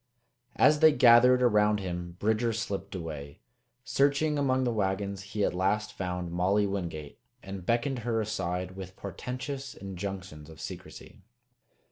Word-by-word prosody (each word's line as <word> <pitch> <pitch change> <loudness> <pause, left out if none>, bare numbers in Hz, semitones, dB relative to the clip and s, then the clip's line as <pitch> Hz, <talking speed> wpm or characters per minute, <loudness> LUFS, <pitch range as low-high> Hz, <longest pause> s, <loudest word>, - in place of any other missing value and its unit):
As 150 0 +5
they 160 0 +7
gathered 125 0 +6
around 105 -3 +4
him 90 -2 -5
Bridger 110 +3 +1
slipped 105 -3 -4
away. 75 -5 -7 0.4
Searching 140 +3 +2
among 130 -2 +2
the 125 - +1
wagons, 100 -1 -1 0.2
he 105 - +2
at - - 0
last 100 +4 0
found 90 -2 -4
Molly 95 +4 +2
Wingate 85 -7 -4 0.2
and 95 -1 -7
beckoned 120 +3 +1
her 115 -1 -1
aside 90 -4 -2
with 95 -1 -8
portentous 130 - -6
injunctions 95 -5 -7
of 80 -1 -13
secrecy. - - -9
100 Hz, 135 wpm, -29 LUFS, 90-120 Hz, 0.4 s, they